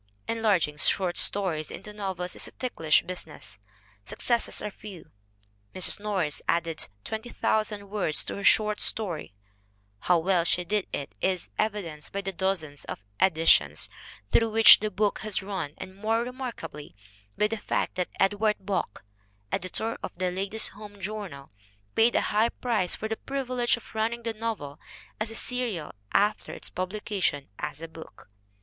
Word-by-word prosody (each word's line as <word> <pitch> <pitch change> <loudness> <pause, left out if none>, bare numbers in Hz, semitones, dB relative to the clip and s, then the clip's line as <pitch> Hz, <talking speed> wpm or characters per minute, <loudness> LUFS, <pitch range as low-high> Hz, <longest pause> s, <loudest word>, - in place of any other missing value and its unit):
Enlarging 200 -10 +2
short 180 +5 +4
stories 175 -6 +1
into 210 - -8
novels 190 -3 -3
is - - -3
a - - -11
ticklish 165 -12 +2
busi 185 -2 -5
ness. 110 -9 -10 0.4
Successes 235 - 0
are 210 - -4
few. 200 -3 -11 0.6
Mrs. 185 - +5
Norris 190 -8 -1
added 165 -1 0 0.2
20,000 215 -2 -1
words 195 -6 +1
to - - -3
her 200 - -5
short 210 +1 +4
story. 175 - -1 0.6
How 175 - +3
well 175 +1 +2
she 175 +1 +1
did 210 +1 0
it 140 -7 -4
is 185 -2 -1
evi 210 -1 +1
denced 150 -3 -8
by 200 - -2
the 195 0 -3
dozens 175 -6 -2
of - - -5 0.2
editions 160 - +4 0.4
through 225 -1 +4
which 225 0 +10
the 215 - -1
book 210 +1 0
has 215 -3 -2
run 190 -7 -4
and 185 0 -8
more 220 +3 +1
remarkably 240 - -7 0.4
by 210 - +3
the 225 - -2
fact - - -1
that 180 -1 -2
Edward 205 +2 +3
Bok, 190 - -3 0.5
editor 220 +5 -1
of - - -6
the 185 0 0
Ladies' 200 +4 +2
Home 205 0 -11
Journal, 190 -8 -6 0.4
paid 230 +2 +4
a - - +4
high 220 +3 +2
price 220 -9 0
for 220 - -4
the 220 0 -2
privilege 255 -3 0
of 235 - -14
running 230 +2 -1
the 230 0 -2
novel 215 -11 -4 0.4
as 215 +1 -1
a 225 - -6
serial 235 -11 -2 0.2
after 210 +2 +2
its - - -7
publication 185 -6 -1
as 150 +1 -5
a - - -4
book. 160 -9 -13
200 Hz, 160 wpm, -28 LUFS, 170-220 Hz, 0.6 s, which